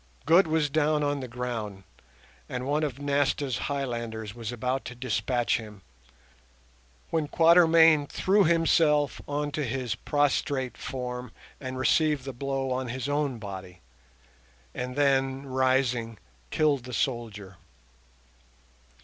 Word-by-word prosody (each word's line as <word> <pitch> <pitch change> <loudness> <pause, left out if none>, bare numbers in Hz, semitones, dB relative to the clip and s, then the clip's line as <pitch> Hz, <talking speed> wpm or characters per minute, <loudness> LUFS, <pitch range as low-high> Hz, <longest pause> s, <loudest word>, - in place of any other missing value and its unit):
Good 170 +3 +5
was 160 -1 +1
down 150 0 +1
on 145 0 0
the 130 - -5
ground, 115 -5 -5 0.7
and 125 0 -4
one 150 +3 0
of 140 -4 -2
Nasta's 140 -3 0
highlanders 115 -6 -3
was 115 -1 -6
about 125 +3 -2
to 125 - -7
dispatch 125 0 0
him, 105 -4 -11 1.3
when 160 -2 0
Quatermain 165 -2 +5
threw 200 +6 +2
himself 160 -3 +3
on 145 0 -2
to 150 +1 -2
his 125 -2 -2
prostrate 135 -1 0
form 125 -2 -5 0.3
and 130 -1 -5
received 150 +1 +2
the 135 - -5
blow 135 +1 -2
on 130 0 -2
his 125 +3 -4
own 145 -3 0
body, 95 -4 -8 0.9
and 125 0 -5
then, 135 -1 +1
rising, 130 -3 +1 0.3
killed 145 - +1
the 125 - -8
soldier. 110 -7 -3
130 Hz, 125 wpm, -27 LUFS, 120-145 Hz, 1.3 s, Good